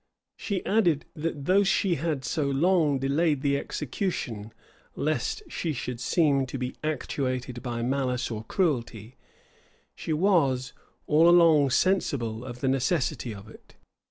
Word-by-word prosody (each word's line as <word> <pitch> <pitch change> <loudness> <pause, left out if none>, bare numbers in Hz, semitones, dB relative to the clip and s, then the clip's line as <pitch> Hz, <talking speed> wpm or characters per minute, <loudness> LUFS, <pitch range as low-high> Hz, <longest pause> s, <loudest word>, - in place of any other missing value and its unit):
She 200 -4 -4
added, 175 -8 +2
that 150 -3 -4
though 195 +4 +4
she 195 -1 +2
had 150 -4 -2
so 145 +4 -1
long 155 0 +2
delayed 140 +2 +1
the 140 -1 +2
execution, 125 - -4 0.4
lest 155 - -1
she 170 - -3
should 125 -2 -5
seem 140 0 +2
to 130 - -5
be 125 0 -4
actuated 130 -4 -3
by 120 -2 -3
malice 130 -1 -1
or 110 -1 -4
cruelty, 120 - -2 0.8
she - - -6
was 150 -7 +2 0.3
all 160 +3 +5
along 165 -5 +6
sensible 125 - 0
of 125 -1 -8
the 135 - 0
necessity 130 -2 0
of 100 0 -10
it. 110 - -17
140 Hz, 135 wpm, -27 LUFS, 125-165 Hz, 0.8 s, along